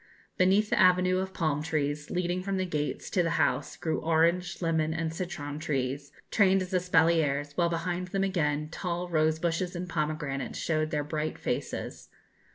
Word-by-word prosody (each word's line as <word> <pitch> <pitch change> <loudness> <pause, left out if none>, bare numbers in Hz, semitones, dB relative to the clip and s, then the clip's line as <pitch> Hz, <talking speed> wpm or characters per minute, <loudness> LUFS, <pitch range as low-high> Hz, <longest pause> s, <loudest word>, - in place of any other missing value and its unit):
Beneath 195 +3 +3
the - - +2
avenue 185 0 +5
of 190 0 -3
palm 155 -5 0
trees, 150 -1 -2
leading 180 0 -1
from 195 +1 -2
the 185 - 0
gates 150 -4 -3
to 180 - +3
the 165 - +1
house, - - 0
grew 160 - -1
orange, 170 +2 +2
lemon, 160 -2 0
and 160 0 -2
citron 160 -5 -5
trees, 140 -2 -2 0.2
trained 195 -2 +4
as 185 +1 -8
espaliers, 160 -5 +2
while 170 -1 +2
behind 175 +2 -2
them 195 +1 -1
again 150 -6 0
tall 175 +1 -3
rose 155 -1 +2
bushes 175 +2 -1
and 180 +1 -4
pomegranates 150 -4 -2
showed 155 -1 0
their 150 -1 -1
bright 155 +1 -3
faces. - - -4
165 Hz, 165 wpm, -29 LUFS, 155-180 Hz, 0.2 s, avenue